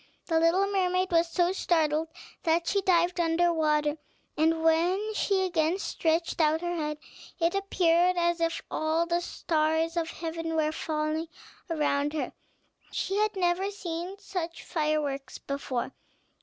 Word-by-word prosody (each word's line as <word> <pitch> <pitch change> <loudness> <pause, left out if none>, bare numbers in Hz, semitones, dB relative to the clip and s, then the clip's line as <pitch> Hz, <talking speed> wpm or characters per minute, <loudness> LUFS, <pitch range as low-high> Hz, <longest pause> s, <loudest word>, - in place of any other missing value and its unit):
The 325 -2 +2
little 335 +4 +3
mermaid 370 -2 +1
was 335 0 +3
so 350 +1 +2
startled 320 -4 +1 0.3
that 335 +1 +1
she 400 - +1
dived 355 -1 +2
under 340 +1 +3
water; 300 -1 +1 0.4
and 320 +1 +2
when 355 +7 +2
she 395 -2 +1
again 330 -1 +1
stretched 335 -3 0
out 315 +1 +3
her 350 0 -2
head, 300 -2 -2 0.4
it 335 0 +2
appeared 365 -2 +2
as 345 -1 +1
if 330 0 0
all 315 +2 +1
the 345 0 +1
stars 320 0 0
of 330 -1 0
heaven 330 -1 -4
were 310 -1 +2
falling 310 +1 -2 0.4
around 295 -2 0
her, 310 - -3 0.6
she 390 - -2
had 430 0 +1
never 365 +1 +1
seen 360 -1 -5
such 345 -4 -5
fireworks 300 -4 -1
before. 275 -3 -3
330 Hz, 140 wpm, -28 LUFS, 315-355 Hz, 0.6 s, little